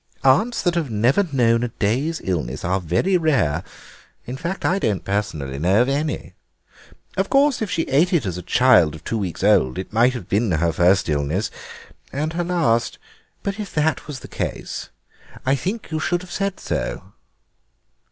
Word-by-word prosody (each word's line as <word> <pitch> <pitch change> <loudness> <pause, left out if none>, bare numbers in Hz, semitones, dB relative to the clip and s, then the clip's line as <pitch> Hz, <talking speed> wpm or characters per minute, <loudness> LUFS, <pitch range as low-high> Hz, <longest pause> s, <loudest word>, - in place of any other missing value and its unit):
Aunts 205 - +3
that 175 - +2
have 165 -5 -1
never 120 - +2
known 115 -4 +3
a 120 - 0
day's 125 +9 -1
illness 75 -9 -2
are 95 +2 0
very 90 - +1
rare; 125 - +1 0.6
in 125 - -5
fact, 170 +7 -4
I 190 +2 +2
don't 105 - -1
personally 80 -9 -2
know 95 +6 +3
of 125 - -2
any. 150 +2 -2 0.8
Of - - 0
course 275 -2 +3
if 215 - -1
she 165 - 0
ate 155 +8 +2
it 170 - +2
as 90 -3 -2
a 90 - -5
child 90 -7 +4
of 80 - -12
two 115 - -2
weeks 90 -3 -4
old 100 -11 +3
it 95 +2 -6
might 120 +3 +4
have 120 -9 -7
been 105 +1 +1
her 80 +1 +1
first 90 +3 +3
illness—and 95 - -4
her 175 +1 -1
last. 165 -10 +1 0.5
But 200 +1 -3
if 205 -3 -6
that 150 -2 0
was 145 -4 -6
the - - -9
case - - -5 0.6
I 135 - +3
think 190 - -3
you 160 - -1
should 175 +2 -1
have 180 - -12
said 195 +1 -2
so." - - -4
125 Hz, 180 wpm, -22 LUFS, -, 0.8 s, child